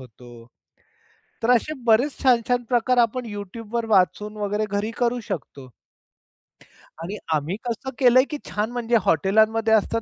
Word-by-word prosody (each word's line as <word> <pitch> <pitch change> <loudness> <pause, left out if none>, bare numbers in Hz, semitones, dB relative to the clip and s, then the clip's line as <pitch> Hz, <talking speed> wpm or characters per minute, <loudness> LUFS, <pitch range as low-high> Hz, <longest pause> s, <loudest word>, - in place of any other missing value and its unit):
होतो. 120 -1 -14 1.0
तर 245 - +3
असे 305 +7 -1
बरेच 240 +6 +3
छान-छान 245 -1 +2
प्रकार 250 0 +1
आपण 240 +1 +1
YouTube 205 +2 -8
वर 235 -1 -1
वाचून 210 +1 +1
वगैरे 210 +1 -1
घरी 205 +2 -2
करू 245 0 +1
शकतो. 140 -6 -6 1.3
आणि 200 +5 -5 0.2
आम्ही 155 +5 -1
कसं 240 +3 -4
केलंय, 255 0 +6
की 300 - -4
छान 210 +3 -2
म्हणजे 240 -1 -1
हॉटेलमध्ये 220 +6 +2
असतात 225 +1 +1
220 Hz, 140 wpm, -23 LUFS, 200-240 Hz, 1.3 s, केलंय